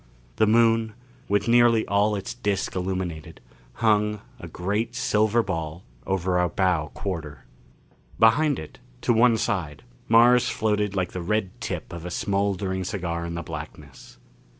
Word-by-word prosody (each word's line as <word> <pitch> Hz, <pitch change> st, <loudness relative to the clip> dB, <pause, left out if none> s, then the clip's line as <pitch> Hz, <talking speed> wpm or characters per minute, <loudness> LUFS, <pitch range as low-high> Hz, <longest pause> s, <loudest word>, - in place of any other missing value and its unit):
The 110 Hz, -, +4 dB
Moon, 115 Hz, 0 st, +3 dB, 0.4 s
with 100 Hz, +1 st, +1 dB
nearly 120 Hz, -1 st, +4 dB
all 105 Hz, +1 st, +2 dB
its 100 Hz, -1 st, -5 dB
disc 100 Hz, -2 st, -2 dB
illumined, 90 Hz, -4 st, -4 dB, 0.5 s
hung, 105 Hz, -1 st, +2 dB, 0.2 s
a -, -, -8 dB
great 105 Hz, +6 st, -2 dB
silver 110 Hz, 0 st, +2 dB
ball, 80 Hz, -3 st, -4 dB, 0.2 s
over 90 Hz, -1 st, 0 dB
our 90 Hz, 0 st, +2 dB
bow 90 Hz, -3 st, +1 dB
quarter. 80 Hz, -7 st, -5 dB, 0.7 s
Behind 140 Hz, +6 st, +4 dB
it, -, -, -9 dB, 0.2 s
to 120 Hz, -, +2 dB
one 115 Hz, 0 st, +4 dB
side, 85 Hz, -11 st, -2 dB, 0.2 s
Mars 120 Hz, +2 st, +5 dB
floated 105 Hz, -2 st, 0 dB
like 90 Hz, -2 st, -1 dB
the 90 Hz, -, -5 dB
red 100 Hz, +1 st, -1 dB
tip -, -, -5 dB
of 85 Hz, -1 st, -7 dB
a 90 Hz, -, -5 dB
smoldering 100 Hz, 0 st, -1 dB
cigar 85 Hz, -3 st, -3 dB
in 85 Hz, -, -5 dB
the 85 Hz, -, -4 dB
blackness. 75 Hz, -3 st, -10 dB
100 Hz, 145 wpm, -25 LUFS, 90-110 Hz, 0.7 s, Mars